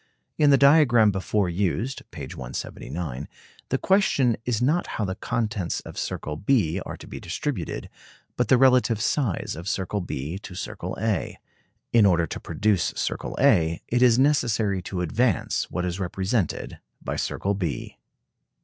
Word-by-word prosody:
In 150 -1 +4
the 140 - +7
diagram 135 -7 +6
before 95 +1 0
used 100 +8 -1
(p. - - -9
179) 75 -1 -6 0.4
the 135 - +1
question 140 - +3
is 120 -3 0
not 150 +8 +1
how 105 - 0
the 95 - -2
contents 105 -5 -2
of - - -10
circle 75 - -4
B 95 - +1
are - - -6
to - - -12
be - - -8
distributed, 90 - -4 0.5
but - - +1
the 130 - +5
relative 125 -4 +4
size 120 - -1
of 85 +4 -5
circle 95 +2 -2
B 80 +1 -4
to 95 -2 -10
circle - - -5
A. 110 -3 -1 0.6
In 110 -4 +6
order 85 -3 +3
to - - -6
produce 105 -5 0
circle - - -3
A, 80 0 +4
it 120 +1 +1
is 120 -2 +6
necessary 115 -8 +2
to 90 0 -4
advance 105 +4 0
what 90 0 -2
is 90 +1 -3
represented 95 +1 -2 0.2
by - - -3
circle 100 - -1
B. 90 -7 -4
105 Hz, 155 wpm, -25 LUFS, 90-125 Hz, 0.6 s, the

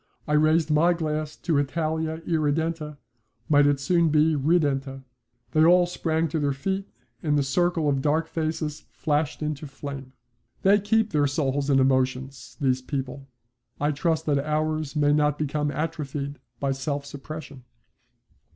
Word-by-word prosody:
I 150 - 0
raised 155 +1 +3
my 165 +4 +4
glass 155 -2 -3
to 160 -4 0
Italia 160 +2 -2
irredenta 155 -1 -1 0.5
might 145 -2 +5
it 145 -1 +2
soon 170 +4 +2
be 155 +1 +4
redenta. 140 -3 0 0.5
They 155 - +4
all 175 +2 +6
sprang 165 -2 -1
to 160 +1 -1
their 145 -1 +1
feet 190 +8 -3 0.3
and 150 -2 +1
the 145 - +2
circle 170 +3 +1
of 140 -2 +1
dark 155 +3 +1
faces 155 -2 -3
flashed 150 -1 -1
into 150 0 -3
flame. 135 -1 -8 0.5
They 200 +2 +5
keep 220 +2 +1
their 145 -2 +2
souls 140 0 -1
and 135 -1 +4
emotions, 130 0 0
these 130 -3 +1
people. 135 0 -5 0.5
I 145 +1 +1
trust 160 +1 0
that 145 -2 +2
ours 155 0 -1
may 145 -1 +3
not 150 -1 +2
become 150 0 -1
atrophied 145 -2 -4 0.2
by 140 -1 0
self 140 +1 -3
suppression. 145 -1 -9
150 Hz, 150 wpm, -25 LUFS, 140-160 Hz, 0.5 s, all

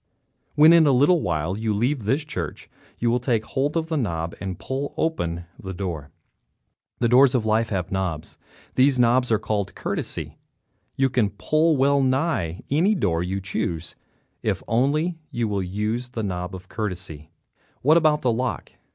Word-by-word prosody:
When, 155 +2 +8
in 165 -2 +6
a - - +5
little 145 +7 +4
while, 80 +4 -1
you 110 0 -1
leave 120 +2 0
this 140 +8 +1
church 90 - -5 0.3
you 120 0 +1
will 125 - +2
take 115 -3 0
hold 145 +4 -1
of 165 0 -2
a 160 - +1
knob 85 - -2
and 95 -3 -4
pull 135 +2 -4
open 85 - -1 0.2
the 95 -1 -6
door. 85 -7 -4 0.9
The 120 - +1
doors 130 +2 +5
of 115 -3 +1
life 110 +1 +2
have 95 -3 -2
knobs. 95 -5 -3 0.3
Those 130 +1 +4
knobs 125 0 +3
are 110 - +5
called 100 -2 -2
courtesy. - - -4 0.6
You 135 -1 +2
can 115 -6 +1
open 155 0 +2
well 140 +1 +3
nigh 130 - 0
any 180 +9 +3
door 85 - 0
you 95 +2 -2
choose 85 -3 -3 0.5
if - - -1
only 150 +8 +1
you 120 -1 -1
will 100 -2 -1
use 105 +6 -2
the 115 -3 -4
knob 90 -1 -4
courtesy. 90 -8 -5 0.5
What 150 +5 +5
about 155 -2 +3
the 125 - +3
lock? 125 +3 -2
115 Hz, 170 wpm, -24 LUFS, 95-140 Hz, 0.9 s, When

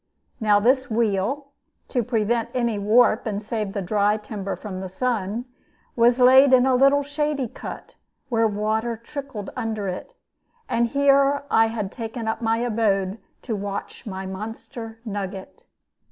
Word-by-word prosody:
Now 210 -3 +4
this 260 +4 +2
wheel 230 +5 0 0.4
(to 250 - +1
prevent 230 0 0
any 235 -4 0
warp, 220 +2 +4
and 210 -1 -3
save 215 -2 -3
the 200 - -2
dry 205 +2 +2
timber 210 -2 -5
from 190 -3 -7
the 190 - -5
sun) 225 +1 -2 0.5
was 240 +1 +4
laid 260 +2 +7
in 255 0 +6
a 265 - +3
little 275 +3 +4
shady 290 -2 -1
cut, - - -9 0.3
where 230 -3 +2
water 220 +2 -1
trickled 235 -3 -7
under 220 -4 -3
it. 185 - -6 0.5
And 235 0 +1
here 280 +2 +3
I 225 0 +5
had 215 -3 -3
taken 225 -1 -5
up 220 +1 -2
my 225 0 +1
abode 215 -4 0 0.2
to 230 - -2
watch 200 +2 -6
my 190 -1 -5
monster 225 +4 -7
nugget. 195 -2 -6
225 Hz, 150 wpm, -23 LUFS, 205-250 Hz, 0.5 s, laid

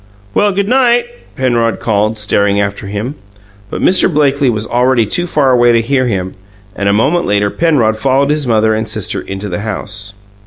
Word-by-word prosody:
"Well, 205 0 +2
good 200 +1 -1
night," 245 -1 +3 0.3
Penrod 120 -3 0
called, 110 0 0
staring 100 -1 +1
after 100 0 -3
him. 105 +7 -4 0.6
But - - -5
Mr. 185 0 +3
Blakely 140 -3 +2
was 110 -2 -1
already 125 -1 +1
too 175 +12 -1
far 145 -5 +2
away 120 -1 +4
to 115 - +3
hear 130 +1 0
him, 95 -4 -3 0.4
and 100 0 -1
a - - +3
moment 135 +12 +1
later 100 0 +1
Penrod 140 -10 +1
followed 135 +4 +1
his 150 -3 -1
mother 110 -1 +2
and 110 +1 -2
sister 105 -1 -3
into 95 +2 -6
the 90 0 -4
house. 105 -1 -4
115 Hz, 185 wpm, -13 LUFS, 105-140 Hz, 0.6 s, away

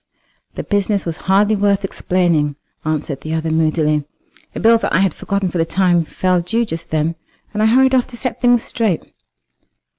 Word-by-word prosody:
"The - - -4
business 205 -1 0
was 165 -2 -3
hardly 205 +3 +4
worth 200 -1 +1
explaining," 170 -6 0 0.3
answered 150 -3 -3
the 155 +2 -3
other 160 0 -2
moodily. 155 -2 +1 0.5
"A - - -3
bill 230 +1 +5
that - - -2
I - - +3
had 195 -5 +2
forgotten 200 -2 -2
for 175 - -2
the - - +4
time 175 -1 +1
fell 185 +2 0
due 225 +7 0
just 165 -5 -6
then, 155 +1 0 0.4
and 210 - -1
I 215 - +4
hurried 260 +3 +4
off 255 -2 +3
to 240 - -9
set 245 -1 -4
things 245 -1 +4
straight." 215 -8 -1
185 Hz, 185 wpm, -18 LUFS, 160-215 Hz, 0.5 s, bill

